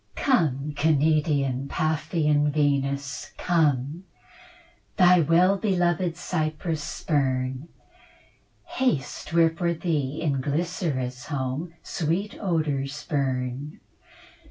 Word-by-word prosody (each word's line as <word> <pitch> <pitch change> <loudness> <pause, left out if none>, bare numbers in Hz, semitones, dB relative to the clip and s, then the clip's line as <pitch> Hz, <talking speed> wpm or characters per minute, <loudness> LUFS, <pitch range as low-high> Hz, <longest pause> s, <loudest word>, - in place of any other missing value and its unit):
Come, 150 - +1
Cnidian, 145 -3 +2
Paphian 150 -1 +1
Venus, 140 -1 -1
come, 155 -1 +1 0.9
Thy 180 -2 +6
well 175 +5 +4
beloved 175 -4 0
Cyprus 155 -2 -2
spurn, 130 -2 -1 1.0
Haste, 245 - -2
where 165 0 +4
for 170 +1 -1
thee 155 -4 -1
in 140 -4 0
Glycera's 145 -4 -2
home 145 +4 -3
Sweet 175 +6 -2
odours 150 -6 -1
burn. 135 0 -2
150 Hz, 85 wpm, -25 LUFS, 140-170 Hz, 1.0 s, Thy